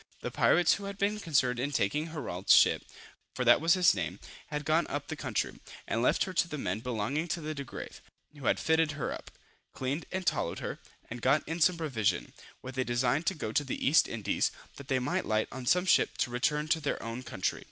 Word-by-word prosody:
The - - -4
pirates 175 -1 +4
who 200 - -4
had 200 0 -6
been 205 +2 0
concerned 130 - +1
in 140 +3 -1
taking 150 +2 0
Herault's 140 - +2
ship, - - +5 0.5
for 125 - -1
that 120 +4 +6
was 165 +2 +4
his 180 -2 +5
name, 90 0 -4 0.3
had 150 -1 -4
gone 160 +3 +2
up 145 0 -3
the 155 - -3
country, 130 -6 -3 0.3
and 115 - 0
left 125 - +3
her 185 - -5
to 170 - +2
the 150 - -5
men 100 -6 -2
belonging 125 +7 -2
to 170 - -2
the 155 -1 -4
Degrave, 140 -4 -8 0.3
who 140 -4 -10
had - - +3
fitted 160 -1 +2
her 140 -3 -3
up, - - -9 0.4
cleaned 135 +5 -3
and 190 -1 -3
tallowed - - 0
her, - - -5 0.3
and 120 0 -6
got 135 +5 +2
in 165 +2 -4
some 180 +2 +4
provision, 115 - -1 0.3
with 130 0 -6
a - - +3
design 120 +3 +1
to - - +1
go 110 -8 -4
to 145 - +1
the 135 - -3
East 150 +4 +5
Indies, 105 -3 0 0.3
that 140 - -10
they 135 -3 +1
might 125 0 -1
light 110 0 +1
on 130 -1 -7
some 180 +5 +3
ship 190 - +3
to 120 - 0
return 150 +5 0
to 160 - +3
their 145 -2 -3
own 115 +2 -5
country. 95 -7 -2
140 Hz, 225 wpm, -30 LUFS, 120-160 Hz, 0.5 s, that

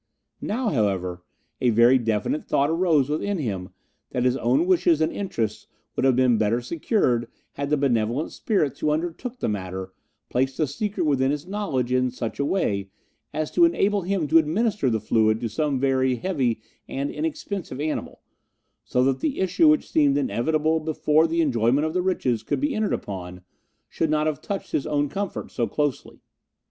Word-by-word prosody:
Now, 235 +2 -1
however, 95 - -1 0.4
a 125 - +3
very 120 +3 +5
definite 115 +5 -1
thought 140 +3 +2
arose 165 -5 +3
within 185 +7 -1
him 100 - -3 0.4
that 125 - -1
his 125 0 +2
own 130 +6 +2
wishes 175 -3 +3
and 160 - +1
interests 110 - -3 0.3
would - - 0
have 130 -2 +4
been 125 -3 +3
better 110 +2 +2
secured 125 - 0 0.2
had 140 0 -4
the 150 - +2
benevolent 125 +1 0
spirits 195 - -1
who 150 - +1
undertook 175 +11 -3
the - - -2
matter 95 -2 -4 0.3
placed 130 +1 -1
the 155 - +2
secret 205 +9 -3
within 135 -4 +2
his 145 +2 -2
knowledge 180 - -2
in 130 0 +2
such 120 -2 -5
a 140 - +1
way 100 - 0 0.4
as 155 -1 -3
to 345 - +4
enable 205 -12 +3
him 185 -3 -1
to 165 - +7
administer 185 - +1
the 110 -2 0
fluid 110 0 +2
to 115 - -2
some 140 +3 -1
very 130 -1 +2
heavy 130 -9 -1 0.3
and 140 +1 -3
inexpensive 160 0 -4
animal, 155 +1 -3 0.6
so 125 - +1
that 135 0 +1
the 295 - -2
issue 190 - +3
which 305 0 +4
seemed 290 -3 +3
inevitable 160 - +1
before 155 0 +2
the 165 +1 +1
enjoyment 130 0 +2
of 160 - -2
the 180 - +1
riches 130 - 0
could - - -2
be 290 +1 0
entered 215 -1 0
upon 90 -2 -6 0.4
should 160 - -1
not 155 0 +1
have 155 -3 -1
touched 200 -1 -5
his 140 - -1
own 145 -1 +1
comfort 200 +5 -4
so 120 -2 -1
closely. 145 +5 -3
145 Hz, 180 wpm, -24 LUFS, 120-170 Hz, 0.6 s, to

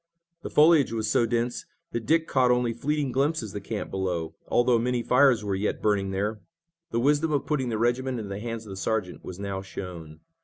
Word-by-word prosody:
The - - -6
foliage 155 -3 +5
was 110 -1 -1
so 115 - +3
dense 120 +1 -1 0.2
that 115 -2 -4
Dick 160 +2 +3
caught 130 -2 +3
only 125 -1 +2
flitting 145 +3 -1
glimpses 135 -5 0
of - - -16
the 105 - -5
camp 110 -2 -3
below, 90 -4 -2
although 120 -1 +3
many 120 0 0
fires 125 -3 +4
were 100 -1 -1
yet 100 +2 -1
burning 100 -2 +1
there. 105 +3 -2 0.5
The 115 - -1
wisdom 145 +5 +2
of 145 -2 0
putting 135 -4 -1
the 110 - -1
regiment 125 +3 0
into 105 -3 -5
the 100 +1 -4
hands 115 0 -5
of 105 - -9
the 95 - -7
sergeant 100 -2 -2
was 90 - -7
now 100 -1 -4
shown. 85 -5 -8
115 Hz, 215 wpm, -26 LUFS, 100-130 Hz, 0.5 s, foliage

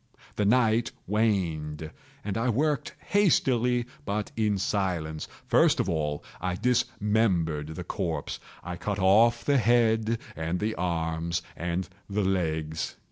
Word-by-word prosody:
The 105 - +1
night 115 +1 +3 0.2
waned, 80 -8 0 0.3
and 100 -2 -2
I 115 +3 +1
worked 145 +5 0
hastily, 125 - +3 0.2
but 105 +1 -2
in 105 -2 +1
silence. 90 -6 -1 0.2
First - - +4
of - - +1
all 75 -4 -1 0.2
I 90 +1 -1
dismembered 105 - +1
the 90 - -5
corpse. 85 -5 -3 0.2
I 90 -1 -5
cut 105 +2 -2
off 110 +5 +4
the 140 -2 +4
head 115 -1 +3 0.2
and 85 +2 -2
the 110 +3 0
arms 85 -1 -1
and 90 +1 -2 0.2
the 100 +1 0
legs. 80 -4 -1
100 Hz, 130 wpm, -28 LUFS, 85-115 Hz, 0.3 s, First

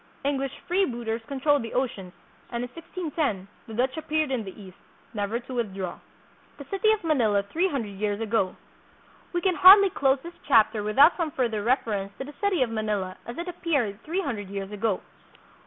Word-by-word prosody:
English 275 -1 -1
free 370 +3 +2
booters 235 -6 -2
controlled 285 +1 +2
the 230 - -6
oceans, 230 -8 -2 0.4
and 235 0 -3
in 245 - -5
1610 310 - -3 0.2
the 225 - -8
Dutch 260 +3 0
appeared 310 -2 -1
in 250 -4 -1
the 195 +1 -10
East, 190 -3 -13 0.3
never 210 +2 -2
to 255 +2 -10
withdraw. 195 -6 -3 0.6
The 285 - -9
City 415 +2 +3
of 435 -3 0
Manila 230 -11 +2
Three 330 - 0
Hundred 235 - -3
Years 205 -1 -1
Ago. 220 -4 0 0.8
We 350 - -1
can 375 -1 +2
hardly 385 +2 +9
close 270 -3 +2
this 340 +1 -8
chapter 225 -4 +4
without 270 +10 +5
some 335 -3 0
further 235 -6 -1
ref 255 +4 +2
erence 200 -2 -4
to - - -4
the 290 +2 -10
city 390 -9 +2
of 235 - -3
Manila 210 -4 -2
as 235 - -7
it 340 +1 -4
appeared 280 - -1
three 350 +5 -1
hundred 210 -9 -4
years 195 0 -5
ago. 210 -1 -1
245 Hz, 190 wpm, -26 LUFS, 210-310 Hz, 0.8 s, hardly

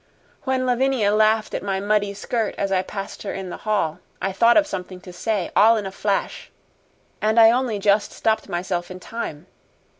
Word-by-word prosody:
When 260 -1 0
Lavinia 250 -4 +2
laughed 215 0 +2
at - - -2
my 195 -1 -2
muddy 205 0 0
skirt 225 +1 -2
as 195 -1 -1
I 185 -1 +2
passed 195 +1 -7
her 200 - -5
in 190 -2 -6
the - - -6
hall, 165 -7 0 0.2
I 195 - -1
thought 230 +7 +4
of 310 - +5
something 185 -6 -6
to 180 - -11
say 205 0 -2
all 225 +2 +6
in 210 - -3
a 190 - -5
flash 200 +1 -2 0.7
and 220 +2 +3
I 225 0 +8
only 245 -3 0
just 205 +1 +2
stopped 220 0 -1
myself 175 0 -3
in 185 0 -8
time. 185 -6 -6
205 Hz, 190 wpm, -22 LUFS, 190-225 Hz, 0.7 s, I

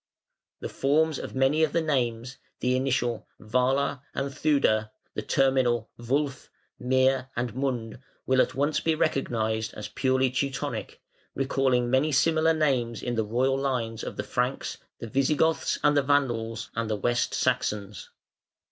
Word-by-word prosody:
The - - -3
forms 155 +2 +1
of - - -7
many 135 +4 +3
of 160 -2 +2
the 170 - +2
names, 125 -4 -1 0.2
the 125 0 +1
initial 125 -3 -1
"Wala" 130 +4 0
and 140 0 -2
"Theude", 135 -8 +2 0.2
the - - -3
terminal 125 -2 +1
"wulf", 135 +3 -2 0.3
"mir", 130 0 +2
and 120 -2 -2
"mund" 125 -3 -3 0.3
will 130 - +2
be - - +7
at - - -1
once 145 +3 0
recognised 115 -9 0
as 105 -1 -6
purely 130 -1 +1
Teutonic, 135 +1 -3 0.3
recalling 130 -3 +1
many 135 +4 +3
similar 160 +3 +3
names 125 -8 0
in 120 - -2
the 110 -2 +1
royal 130 +5 +1
lines 120 -5 -2
of - - -6
the - - -2
Franks, - - -2 0.2
the - - -7
Visigoths 150 +7 +1
and 150 0 +4
the 145 - +5
Vandals, 120 -5 0
and 115 -1 -2
the 110 - 0
West 120 +3 0
Saxons. 100 -2 -1
130 Hz, 145 wpm, -27 LUFS, 115-140 Hz, 0.3 s, be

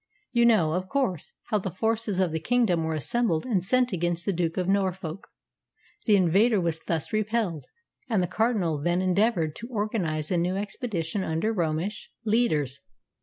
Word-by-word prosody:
You 235 -2 +4
know, 175 -9 +4
of 185 +1 -2
course, 250 - -1 0.2
how 210 - +3
the 190 - -3
forces 220 +1 -1
of 185 -3 +2
the 160 - -1
kingdom 200 -4 +2
were 160 0 -1
assembled 210 - +1
and 205 -8 0
sent 250 +3 +2
against 175 -1 -1
the 200 - +1
Duke 165 -2 -1
of 180 -1 0
Norfolk. 190 -2 -1 0.8
The 210 - +6
invader 200 +4 +4
was 165 -2 0
thus 160 +1 -3
repelled, 215 -7 -1 0.4
and 220 -4 +2
the - - +2
Cardinal 185 -5 0
then 175 +4 +1
endeavoured 185 -4 +1
to 235 - -7
organise 200 -9 -2
a 180 - +2
new 175 +2 0
expedition 195 -3 -3
under 165 +8 -1
Romish 170 +2 -2 0.2
leaders. 155 - +1
185 Hz, 170 wpm, -26 LUFS, 165-220 Hz, 0.8 s, The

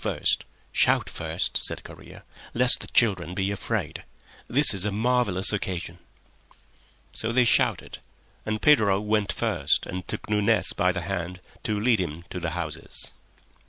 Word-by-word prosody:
"Shout - - +2
first," - - -2
said - - -4
Correa, - - -13 0.3
"lest 125 +1 +4
the - - -9
children 90 -7 +2
be 95 +1 -1
afraid. 100 - -3 0.4
This 140 +1 +5
is 95 -2 -2
a 105 - -1
marvellous 110 -3 +1
occasion." 90 -3 -4 1.1
So 115 - -3
they 125 +1 +3
shouted, - - +1 0.4
and 110 0 -2
Pedro 105 -10 +4
went 105 -1 0
first 70 +1 0
and 90 0 -6
took - - -5
Nunez 105 +1 +2
by 90 -2 +2
the 90 -1 -4
hand 90 0 -4 0.3
to 105 -1 -1
lead 115 0 +2
him 85 -2 -4
to 90 - -4
the 85 -1 -4
houses. 80 -1 0
100 Hz, 145 wpm, -25 LUFS, 90-110 Hz, 1.1 s, This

